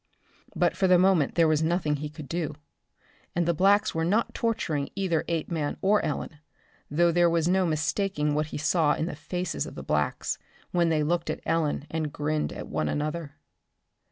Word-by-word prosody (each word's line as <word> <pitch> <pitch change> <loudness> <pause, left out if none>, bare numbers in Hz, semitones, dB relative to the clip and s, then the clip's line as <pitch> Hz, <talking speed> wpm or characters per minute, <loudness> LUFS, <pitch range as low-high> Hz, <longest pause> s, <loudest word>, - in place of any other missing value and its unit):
But - - +2
for 190 - +2
the 180 -1 +6
moment 180 -5 +3
there 165 -2 +5
was 155 -1 +2
nothing 160 -2 +1
he 150 +1 -5
could 150 -1 -10
do. 160 0 -3 0.8
And 175 0 +1
the 170 - +3
blacks 200 +5 +3
were 160 - 0
not 205 +8 +1
torturing 160 -11 -1
either 185 -5 0
Apeman 160 -2 -2
or 205 +2 +3
Ellen, 150 -1 -3 0.5
though 170 +4 +3
there 175 0 +4
was 165 -1 +1
no 185 0 +3
mistaking 155 0 0
what 150 +1 0
he - - -6
saw 155 +1 +2
in 155 - -1
the 170 - -4
faces 175 +4 -3
of - - -10
the - - -7
blacks - - -1 0.3
when 170 -2 +2
they 155 -2 +2
looked 170 +2 0
at - - -3
Ellen 160 -3 0
and 155 -2 -2
grinned 150 +1 -1
at - - -7
one 75 - -1
another. 150 0 -3
165 Hz, 185 wpm, -27 LUFS, 150-175 Hz, 0.8 s, the